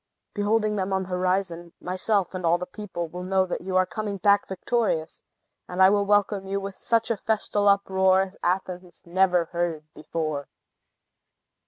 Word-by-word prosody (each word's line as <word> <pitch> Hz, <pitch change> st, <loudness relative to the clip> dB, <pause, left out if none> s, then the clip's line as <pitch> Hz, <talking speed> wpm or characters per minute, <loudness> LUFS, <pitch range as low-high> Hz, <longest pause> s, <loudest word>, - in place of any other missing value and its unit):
Beholding 210 Hz, 0 st, +1 dB
them 190 Hz, 0 st, -2 dB
on 190 Hz, 0 st, +1 dB
the 185 Hz, -, -10 dB
horizon, 180 Hz, -2 st, -1 dB
myself 185 Hz, +1 st, 0 dB
and 185 Hz, -1 st, -5 dB
all 170 Hz, +1 st, +3 dB
the 180 Hz, -, -5 dB
people 180 Hz, -3 st, -6 dB
will 180 Hz, +3 st, -7 dB
know 190 Hz, +1 st, +1 dB
that 180 Hz, -, -4 dB
you 185 Hz, +1 st, -4 dB
are 185 Hz, -, +4 dB
coming 200 Hz, +2 st, -4 dB
back 200 Hz, +2 st, +3 dB
victorious, 190 Hz, -5 st, -1 dB, 0.5 s
and 180 Hz, 0 st, -5 dB
will 200 Hz, +2 st, +5 dB
welcome 205 Hz, -1 st, +2 dB
you 195 Hz, +1 st, -1 dB
with 195 Hz, 0 st, -6 dB
such 230 Hz, +3 st, 0 dB
a 225 Hz, -, 0 dB
festal 205 Hz, -1 st, 0 dB
uproar 190 Hz, -1 st, +4 dB
as 195 Hz, 0 st, -9 dB
Athens 180 Hz, -1 st, -3 dB
never 180 Hz, 0 st, +2 dB
heard 170 Hz, -3 st, -2 dB
before." 155 Hz, -2 st, -4 dB
190 Hz, 165 wpm, -25 LUFS, 180-200 Hz, 0.5 s, will